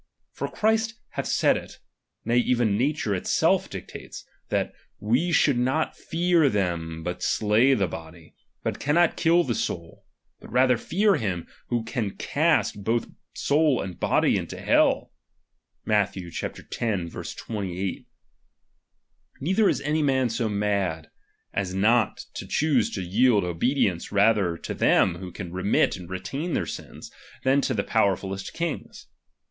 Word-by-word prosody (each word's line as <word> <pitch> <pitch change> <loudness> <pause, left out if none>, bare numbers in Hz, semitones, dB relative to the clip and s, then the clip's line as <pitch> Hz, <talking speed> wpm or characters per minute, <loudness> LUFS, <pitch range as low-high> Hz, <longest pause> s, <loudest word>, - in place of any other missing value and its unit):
For - - -4
Christ 220 +1 +1
hath - - -4
said - - +3
it, - - -9 0.5
nay 120 - +2
even 120 -4 +2
nature 130 -2 0
itself 95 - +1
dictates, - - -9 0.2
that - - -1 0.3
we 125 +12 +1
should 145 -6 +3
not 130 +6 0
fear 170 -3 +2
them 85 -6 -2
who 90 - -2
slay 115 +6 +3
the 100 -5 +1
hody, 80 0 -10 0.3
but - - -2
cannot 165 +4 +3
bill 170 +1 +5
the 125 - -1
soul; 85 -5 -4 0.4
hut - - -12
rather 130 0 +4
fear 200 - +2
him, 90 -6 -2 0.2
who 120 -2 -1
can 115 -3 -3
cast 100 - +1
both 115 +2 0 0.3
soul 145 -2 +2
and 95 -3 -5
body - - +2
into - - -5
hell - - +2 0.7
(Matth. 105 -2 +1
X. 85 -3 -6
28). 95 -1 -4 1.3
Neither 190 +8 +2
is - - 0
any 155 +1 0
man 130 -3 +2
so 115 0 -1
mad, 100 -6 -1 0.4
as 95 -1 -2
not 110 +2 +2
to - - -7
choose 155 -1 +2
to 95 - -3
yield 105 +3 +3
obedience 90 - 0
rather 100 -4 +3
to - - -5
them 85 -2 +3
who 90 -1 -7
can 90 -1 -7
remit 95 +3 +2
and 90 -2 -10
retain 100 - -4
their - - 0
sins, - - -8 0.3
than 135 +2 +3
to 130 - -1
the 100 - 0
powerfulest 95 -2 0
kings. 170 -1 -4
110 Hz, 140 wpm, -25 LUFS, 95-135 Hz, 1.3 s, bill